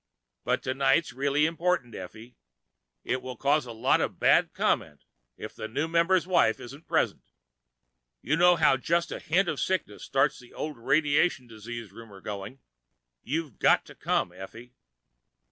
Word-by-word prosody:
But - - 0
tonight's 135 +2 +1
really 140 +3 +1
important, 165 -7 -1
Effie. 110 +6 -10 0.7
It 130 - -2
will 130 0 -7
cause 140 -1 +1
a - - -6
lot 110 0 +2
of - - -2
bad - - +4
comment 75 -3 -1 0.3
if - - -8
the 110 - -6
new 145 +8 -2
member's 170 +2 +2
wife 175 -11 +3
isn't 140 +6 -11
present. - - 0 0.9
You 150 - 0
know 175 +2 +5
how 150 -5 +4
just 170 +6 0
a - - -4
hint 175 +4 +1
of 155 -4 -2
sickness 185 - -2
starts 135 0 +1
the 125 -2 -16
old 150 -3 -5
radiation 145 +2 +2
disease 115 -1 -8
rumor 105 -2 -12
going. 105 +6 -7 0.6
You've 155 -5 -4
got - - +4
to - - -13
come, - - -1
Effie." 115 +7 -11
135 Hz, 155 wpm, -27 LUFS, 115-160 Hz, 0.9 s, know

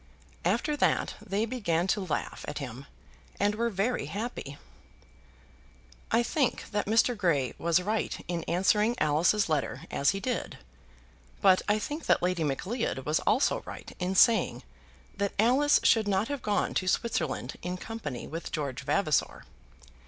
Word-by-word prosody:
After 300 - +1
that - - +1
they 205 +1 -1
began 200 -9 0
to 205 - +1
laugh 180 - -3
at - - -4
him 135 -1 -7 0.5
and 205 +1 +2
were 235 +2 0
very 200 - -1
happy. 200 - -5 1.5
I 235 - +3
think 265 -1 -1
that 205 -2 -1
Mr. 230 +3 +3
Grey 160 - +1
was 170 +1 +2
right 215 +3 -1
in 170 -2 -2
answering 210 +6 +2
Alice's 165 +7 +2
letter 140 -4 -1
as 140 - +2
he 195 - 0
did; 245 +3 -3 0.8
but 185 -1 +5
I 210 - +4
think 295 +8 -5
that - - +3
Lady 180 -2 +1
Macleod 155 - -2
was 150 +1 +1
also 255 - +3
right - - -9
in 185 +1 -1
saying 225 +4 +4 0.5
that 200 0 -1
Alice 260 +7 +4
should 220 -2 +4
not 200 +3 +1
have 285 -3 -3
gone 210 -1 0
to 185 - -1
Switzerland 185 - -1
in 180 +1 -4
company 180 - -6
with 165 +2 -6
George 140 -4 -3
Vavasor. 155 +1 0
195 Hz, 150 wpm, -29 LUFS, 160-225 Hz, 1.5 s, but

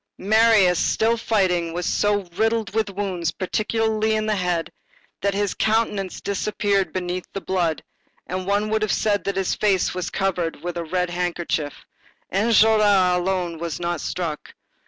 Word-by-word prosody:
Marius, 210 -3 +4
still 225 +1 +2
fighting, 185 -7 0
was 175 0 -3
so 205 -1 +1
riddled 225 -2 0
with 220 -2 0
wounds, 190 -4 -2
particularly 220 +3 0
in 215 0 0
the 215 -1 +1
head, 180 -3 -1 0.5
that 200 0 0
his 205 -1 0
countenance 215 -4 0
disappeared 200 -2 0
beneath 180 0 -3
the 195 - -3
blood, 175 -4 -1 0.4
and 185 0 -4
one 205 +2 +1
would 220 0 +1
have 215 -2 0
said 205 -2 +1
that 200 - -1
his 195 -1 0
face 195 -4 +1
was 180 -1 -3
covered 180 -5 -2
with 175 0 -4
a 170 - -3
red 180 +2 -1 0.2
kerchief. 155 -4 -3 0.5
Enjolras 210 -3 +4
alone 180 -2 -1
was 170 -3 -4
not 175 -2 -2
struck. 165 -4 -4
195 Hz, 155 wpm, -23 LUFS, 180-215 Hz, 0.5 s, Marius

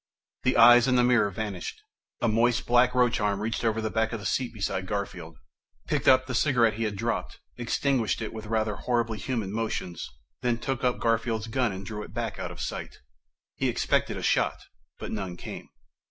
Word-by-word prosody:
The 130 - +2
eyes 120 +1 +8
in 130 - +3
the 125 - +4
mirror 120 -4 +4
vanished. 100 -3 -5 0.4
A - - +2
moist, 115 +2 +2
black 125 +1 +4
roach 125 -2 +3
arm 100 -1 0
reached 110 +3 -2
over 110 -1 +1
the 110 -1 -2
back 110 -1 +1
of 115 - -3
the 100 - -9
seat 125 +6 0
beside 100 -3 -3
Garfield, 90 -6 -4 0.5
picked - - -1
up 130 0 +6
the 130 - -5
cigarette 120 -4 +3
he 115 +2 -2
had 105 -1 -2
dropped, 115 +4 -3 0.2
extinguished 125 -1 0
it 110 - -5
with 110 -1 -7
rather 110 -1 0
horribly 115 -3 -1
human 110 -3 -2
motions, 110 -6 -3 0.3
then 120 -1 +1
took 130 +2 -3
up 125 -1 +2
Garfield's 115 -1 0
gun 120 0 0
and 95 +1 -7
drew 105 +1 -6
back - - -4
out - - -3
of - - -10
sight. - - -5 0.6
He - - +1
expected - - 0
a - - -5
shot, - - +2 0.4
but - - -6
none 95 -4 -4
came. - - -8
115 Hz, 195 wpm, -27 LUFS, 105-120 Hz, 0.6 s, eyes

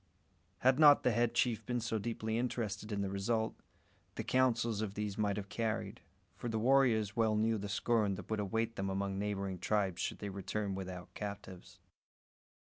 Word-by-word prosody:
Had 130 +2 +4
not 145 -2 +8
the - - +4
head 120 0 +1
chief 120 -2 +1
been 125 -1 -1
so 110 -1 -1
deeply 110 0 -2
interested 110 -4 -3
in 100 -1 -1
the 100 - -2
result, 110 +3 0 0.6
the - - -3
counsels 120 -4 +2
of 105 -2 -3
these 105 -1 -3
might 105 -2 0
have 100 -1 -4
carried; 110 -1 -3 0.3
for 120 - -5
the 110 - -1
warriors 115 -4 +3
well 110 -2 +2
knew 110 +1 +2
the 100 +1 -5
scorn 105 -1 +1
that - - -9
would 110 - 0
await 115 +3 -1
them 95 0 -1
among 95 0 -2
neighbouring 100 -2 -2
tribes 95 -1 0
should - - -2
they 100 - -5
return 100 +1 -3
without 95 -2 -6
captives. 100 -3 -7
105 Hz, 180 wpm, -34 LUFS, 100-115 Hz, 0.6 s, not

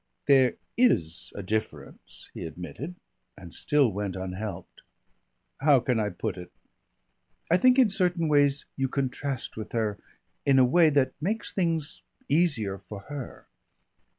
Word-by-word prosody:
"There 135 -3 +5 0.2
is 90 - +2
a 100 - -5
difference," 110 +3 -5
he - - -7
admitted, 90 - -7 0.4
and 90 -3 -11
still 145 -6 +2
went 100 -1 -3
unhelped. 95 0 -6 0.8
"How 140 -1 +5
can 125 -1 0
I 105 -1 0
put 95 +1 -4
it? 90 - -10 1.0
I 175 - +6
think 255 +4 +5
in 250 -6 +5
certain 180 -4 +1
ways 145 -1 +3
you 135 -1 0
contrast 135 -1 -3
with 110 - -7
her, 110 -3 -1 0.4
in 140 -1 +4
a 130 - +7
way 160 +5 +5
that 140 -3 +2
makes 210 +7 -2
things 165 -5 -1 0.3
easier 140 - +1
for 105 -2 -9
her. 140 -4 -7
130 Hz, 140 wpm, -27 LUFS, 105-155 Hz, 1.0 s, a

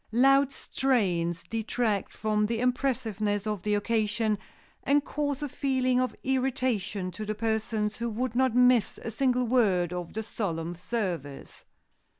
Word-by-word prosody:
Loud 275 +3 +5
strains 185 -13 0
detract 225 -2 -1
from 210 -1 0
the 230 0 -1
impressiveness 220 -5 0
of 210 -3 -2
the 210 +2 +1
occasion, 215 0 0 0.4
and 290 +1 +2
cause 290 -1 -2
a - - -1
feeling 255 -2 +1
of 255 - -1
irritation 250 -8 -1
to 185 +5 -6
the 215 0 -3
persons 220 -1 -1
who 235 0 -2
would 230 +2 -2
not 260 -2 +2
miss 250 -2 +4
a 230 - -4
single 250 +1 +1
word 195 -8 +2
of 180 -1 -5
the 220 - -3
solemn 175 -6 -3
service. 175 - -4
225 Hz, 145 wpm, -28 LUFS, 205-255 Hz, 0.4 s, Loud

